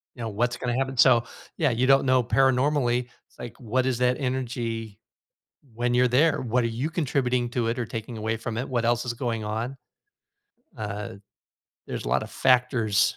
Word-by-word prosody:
you 120 - -9
know, 115 - -3
what's 120 +4 -1
gonna 120 -1 -2
happen, 135 0 -2
so 120 -2 +6 0.3
yeah, 155 -3 +2
you 125 +1 +1
don't 135 0 +5
know 130 -1 +3
paranormally 125 0 +2 0.3
like, 120 - -8
what 130 +2 -1
is 130 -2 0
that 125 0 +2
energy 120 -5 -3 0.8
when 120 +1 0
you're 125 +1 +4
there, 140 +6 +3
what 125 +1 +1
are 115 - 0
you 120 +6 -2
contributing 130 -6 0
to 120 -1 -1
it 115 +1 -1
or 125 - -2
taking 115 +1 -6
away 110 +1 -2
from 115 0 -5
it, 125 +3 -3
what 120 -3 -1
else 120 +1 +1
is 125 - -2
going 115 -3 -3
on, 110 +5 -3 1.0
uh, 105 -2 -5 0.7
there's - - -4
a - - -3
lotta - - +1
factors 120 -5 +2
120 Hz, 180 wpm, -25 LUFS, 115-130 Hz, 1.0 s, so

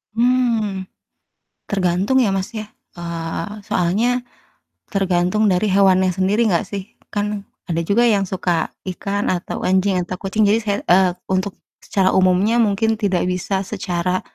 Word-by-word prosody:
Hmm. 230 -5 +1 0.8
Tergantung, 195 +5 +1
ya, 200 -4 +1
Mas, 190 -1 -2
ya, 215 0 -4 0.3
eee, 170 +3 -4
soalnya 220 +8 0 0.7
tergantung 195 +2 +2
dari 185 +3 +2
hewannya 190 -2 +4
sendiri 200 +5 +1
nggak 175 -6 +1
sih? 200 +2 -6 0.2
Kan 205 0 -2 0.2
ada 170 -1 -1
juga 205 +8 +2
yang 205 -4 +3
suka 175 -3 0 0.2
ikan 200 +2 -3
atau 175 -1 -4
anjing 190 +1 +2
atau 185 - -5
kucing 205 +2 +1
jadi 210 +3 +3
saya 205 -2 -1
eee, 185 +1 +4 0.2
untuk 190 +1 -1 0.2
secara 190 -1 +1
umumnya 190 +5 +3
mungkin 220 +1 +2
tidak 190 -4 +1
bisa 190 +2 -1
secara, 185 -2 -2
195 Hz, 140 wpm, -20 LUFS, 185-210 Hz, 0.8 s, hewannya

